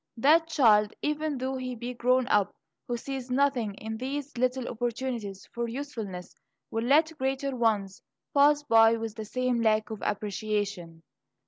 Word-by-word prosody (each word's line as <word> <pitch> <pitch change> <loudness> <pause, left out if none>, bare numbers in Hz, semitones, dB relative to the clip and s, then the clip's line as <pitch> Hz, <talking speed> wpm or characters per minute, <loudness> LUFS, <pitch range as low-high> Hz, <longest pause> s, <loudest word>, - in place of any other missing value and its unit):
That 315 +7 +4
child, 220 -9 +4
even 300 -1 -1
though 260 +1 -2
he 255 -1 -4
be 240 +2 -5
grown 250 +1 +2
up 205 -2 +2 0.3
who 240 - -2
sees 265 +1 -6
nothing 250 -6 +1
in 220 +2 -6
these 275 +3 -4
little 255 +1 0
opportunities 235 -4 -4
for 235 0 -2
usefulness, 225 -8 -6 0.4
will 225 +1 -1
let 310 +5 +3
greater 270 +1 -1
ones 210 -5 0 0.3
pass 290 +1 +5
by 225 -4 +5
with 225 -1 -4
the 220 -1 -7
same 255 +1 -1
lack 215 -1 +2
of 215 - -5
appreciation. 205 -5 -3
240 Hz, 150 wpm, -28 LUFS, 215-270 Hz, 0.4 s, pass